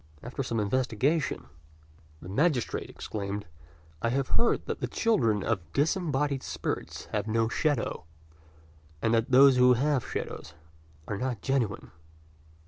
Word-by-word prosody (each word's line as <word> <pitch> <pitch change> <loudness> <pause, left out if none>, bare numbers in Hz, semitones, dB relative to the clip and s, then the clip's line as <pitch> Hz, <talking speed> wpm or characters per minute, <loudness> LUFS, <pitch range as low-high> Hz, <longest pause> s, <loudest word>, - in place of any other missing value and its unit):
After 125 +3 -4
some 115 -3 -1
investigation, 130 - 0 0.8
the - - -8
magistrate 135 - 0
exclaimed, 100 0 -5 0.6
"I 115 - +1
have 135 +2 0
heard 235 - +2
that - - -3
the - - -2
children 115 - +1
of 115 -4 +1
disembodied 145 -3 +1
spirits - - -4
have - - -1
no 115 +1 +2
shadow; 140 - -1 0.9
and 115 +6 +1
that 115 +3 +2
those 130 0 +7
who 125 0 +7
have 135 +1 +1
shadows - - -5 0.5
are 100 - -3
not 125 -5 -3
genuine." 130 -7 -1
125 Hz, 130 wpm, -28 LUFS, 110-140 Hz, 0.9 s, those